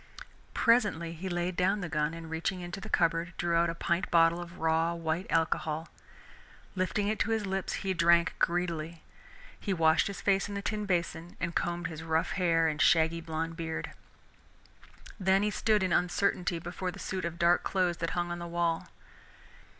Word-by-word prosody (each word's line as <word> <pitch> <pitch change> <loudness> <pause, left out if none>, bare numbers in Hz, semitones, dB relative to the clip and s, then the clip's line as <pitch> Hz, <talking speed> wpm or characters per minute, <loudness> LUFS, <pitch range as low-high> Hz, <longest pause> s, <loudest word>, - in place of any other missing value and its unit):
Presently 205 -9 +2
he 180 +3 -5
laid 175 0 -1
down 190 +3 +1
the 180 - -3
gun, 150 0 -1
and 165 -1 -8
reaching 165 +3 -2
into 175 +2 -6
the - - -8
cupboard, 170 +1 +1
drew 175 -1 0
out 170 0 +3
a 165 - -3
pint 170 +2 -1
bottle 170 0 +4
of 175 0 -10
raw 160 +1 +1
white 165 +2 -2
alcohol. 160 -1 0 0.9
Lifting 190 +2 0
it 215 +1 -1
to - - +1
his 220 -2 0
lips, 190 0 -2
he 190 - +1
drank 170 0 +4
greedily. 170 -2 -1 0.6
He 195 -3 -1
washed 160 -1 +4
his 200 -2 -5
face 195 0 +1
in 200 - -5
the 200 - -4
tin 210 -1 -2
basin 170 -2 -2
and 170 -1 -2
combed 175 0 -1
his 160 -1 -5
rough 160 0 0
hair 165 -3 +2
and 155 -1 -1
shaggy 165 0 +4
blond 165 0 -3
beard. 165 -1 -4 1.3
Then 190 +1 +3
he 210 - +1
stood 210 -1 +2
in 185 -2 +1
uncertainty 180 -1 +1
before 175 +2 -4
the - - -7
suit 190 -1 -4
of 170 0 -3
dark 170 0 +4
clothes 180 -3 0
that 165 - -2
hung 175 0 -1
on 175 - -4
the 170 - -5
wall. 170 +1 -1
170 Hz, 185 wpm, -30 LUFS, 165-185 Hz, 1.3 s, bottle